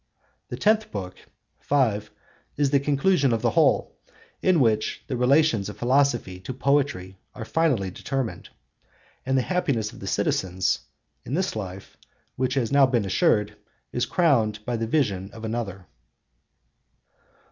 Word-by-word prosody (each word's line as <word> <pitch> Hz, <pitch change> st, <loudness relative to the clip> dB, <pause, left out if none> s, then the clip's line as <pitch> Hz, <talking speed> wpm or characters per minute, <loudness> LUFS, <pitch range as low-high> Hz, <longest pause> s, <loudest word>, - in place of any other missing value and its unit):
The -, -, -6 dB
tenth 215 Hz, 0 st, +2 dB
book 95 Hz, -3 st, -5 dB, 0.5 s
(5) 110 Hz, -7 st, +1 dB, 0.5 s
is 140 Hz, -2 st, +1 dB
the 140 Hz, -, +4 dB
conclusion 140 Hz, +1 st, +2 dB
of 115 Hz, -1 st, -1 dB
the -, -, +2 dB
whole, -, -, +2 dB, 0.4 s
in 185 Hz, -3 st, +3 dB
which 110 Hz, -4 st, +1 dB
the 130 Hz, -, -3 dB
relations 125 Hz, -4 st, +3 dB
of 105 Hz, -, -9 dB
philosophy 120 Hz, -7 st, +1 dB
to 120 Hz, +7 st, -7 dB
poetry 130 Hz, -10 st, 0 dB, 0.2 s
are 115 Hz, -, -6 dB
finally 130 Hz, -, +1 dB
determined, 135 Hz, +4 st, -4 dB, 0.8 s
and 135 Hz, 0 st, +2 dB
the 130 Hz, -, +2 dB
happiness 140 Hz, -, -1 dB
of -, -, -12 dB
the -, -, -7 dB
citizens 95 Hz, 0 st, 0 dB, 0.4 s
in 135 Hz, -, -4 dB
this 190 Hz, -4 st, -1 dB
life, 95 Hz, -2 st, -7 dB, 0.4 s
which 130 Hz, +1 st, -1 dB
has 120 Hz, -5 st, 0 dB
now 140 Hz, -1 st, +6 dB
been 120 Hz, -5 st, 0 dB
assured, 105 Hz, +2 st, +2 dB, 0.4 s
is 120 Hz, 0 st, 0 dB
crowned 115 Hz, -, +1 dB
by 120 Hz, -, -1 dB
the 115 Hz, 0 st, -2 dB
vision 100 Hz, -9 st, 0 dB
of 115 Hz, 0 st, -8 dB
another. 110 Hz, -5 st, -4 dB
120 Hz, 145 wpm, -25 LUFS, 105-140 Hz, 0.8 s, now